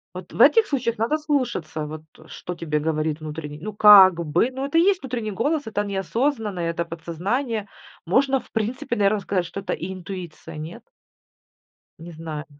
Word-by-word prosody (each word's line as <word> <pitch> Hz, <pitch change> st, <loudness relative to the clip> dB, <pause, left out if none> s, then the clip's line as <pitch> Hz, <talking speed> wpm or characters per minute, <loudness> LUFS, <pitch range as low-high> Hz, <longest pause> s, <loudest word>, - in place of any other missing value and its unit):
Вот -, -, -9 dB
в -, -, 0 dB
этих 455 Hz, -1 st, +7 dB
случаях 240 Hz, -, -1 dB
надо 235 Hz, +8 st, +1 dB
слушаться, 240 Hz, -, -2 dB
вот 155 Hz, +1 st, -7 dB, 0.2 s
что 180 Hz, -, -7 dB
тебе 150 Hz, -3 st, -2 dB
говорит 155 Hz, 0 st, -1 dB
внутренний 150 Hz, -1 st, -7 dB
ну, 215 Hz, -, -5 dB
как 200 Hz, -3 st, +9 dB
бы, 155 Hz, -, +2 dB
ну 265 Hz, +1 st, -4 dB
это 280 Hz, +4 st, 0 dB
и -, -, +6 dB
есть 380 Hz, 0 st, +3 dB
внутренний 240 Hz, -5 st, -4 dB
голос, 290 Hz, -, -1 dB
это 205 Hz, -1 st, -1 dB
неосознанно, 210 Hz, +1 st, -1 dB
это 170 Hz, 0 st, -2 dB
подсознание. 200 Hz, -, -3 dB, 0.4 s
Можно, 270 Hz, +7 st, +3 dB
в 245 Hz, -, -18 dB
принципе, 235 Hz, +2 st, -2 dB
наверно, 205 Hz, 0 st, +2 dB
сказать, 185 Hz, -2 st, -1 dB
что 195 Hz, -, -6 dB
это 195 Hz, -, -3 dB
и 190 Hz, +3 st, -5 dB
интуиция, 185 Hz, -4 st, -8 dB
нет? 155 Hz, +3 st, -8 dB, 1.2 s
Не 170 Hz, +1 st, -10 dB
знаю. 155 Hz, -1 st, -7 dB
200 Hz, 170 wpm, -23 LUFS, 165-245 Hz, 1.2 s, как